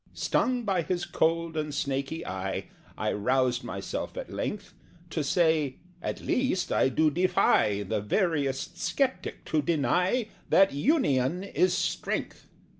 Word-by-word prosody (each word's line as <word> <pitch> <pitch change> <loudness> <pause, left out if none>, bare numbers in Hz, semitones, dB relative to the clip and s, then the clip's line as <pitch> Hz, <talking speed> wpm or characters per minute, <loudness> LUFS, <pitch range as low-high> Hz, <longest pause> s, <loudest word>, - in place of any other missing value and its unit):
Stung 250 -1 +1
by 195 -5 +1
his 175 +2 -2
cold 165 0 0
and 150 -1 -2
snaky 140 +3 -2
eye, 95 +1 -4 0.3
I - - 0
roused 125 +3 +1
myself - - -5
at - - -6
length 205 -1 -4 0.4
To 155 - -1
say 155 -4 +2 0.3
"At - - -4
least 250 -8 0
I - - +3
do 155 +4 +2
defy 140 - +3
The 105 +1 -2
veriest 140 - -1
sceptic 270 -2 -1
to 155 - +1
deny 180 - +1 0.2
That 195 -4 +5
union 155 - +2
is 360 - +1
strength!" - - -2
160 Hz, 130 wpm, -28 LUFS, 135-190 Hz, 0.4 s, That